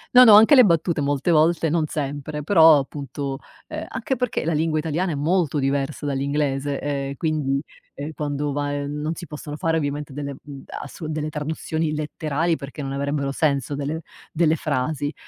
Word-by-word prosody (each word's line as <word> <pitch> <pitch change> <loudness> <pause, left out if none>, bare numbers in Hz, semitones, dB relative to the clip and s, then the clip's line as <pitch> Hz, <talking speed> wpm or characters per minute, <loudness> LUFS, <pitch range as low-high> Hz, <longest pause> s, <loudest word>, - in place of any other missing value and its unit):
No, 250 - +11
no 220 -4 +9
anche 225 +7 +8
le 255 - +9
battute 170 -4 +2
molte 145 +3 0
volte 165 0 +3
non 160 -1 +1
sempre 145 +1 -4
però 160 -3 +7
appunto, 140 0 -5 0.3
ehm, - - -5
anche 265 - -2
perché 250 -8 -2
la 165 - +1
lingua 155 0 +1
italiana 165 +3 -1
è - - -2
molto 155 0 +1
diversa 140 +2 -1
dall'inglese, 140 0 -1
ehm, 140 -1 -3
quindi, 145 -2 0 0.3
ehm, 145 +2 -6
quando 145 -1 -2
va, 145 0 -1
ehm, 145 0 -3
non 155 +2 -1
si 175 0 -9
possono 150 0 -7
fare 165 -1 0
ovviamente 145 -2 -2
delle, 140 -1 -5
uhm, 140 -2 -10
ass 165 - -8
delle 155 -1 -3
traduzioni 155 +1 -2
letterali 155 +2 -1
perché 140 +1 -8
non 135 0 -4
avrebbero 140 0 -1
senso 140 -2 0
delle 145 +3 -3 0.3
delle 160 -1 +2
frasi, 145 0 -2
150 Hz, 175 wpm, -23 LUFS, 140-160 Hz, 0.3 s, No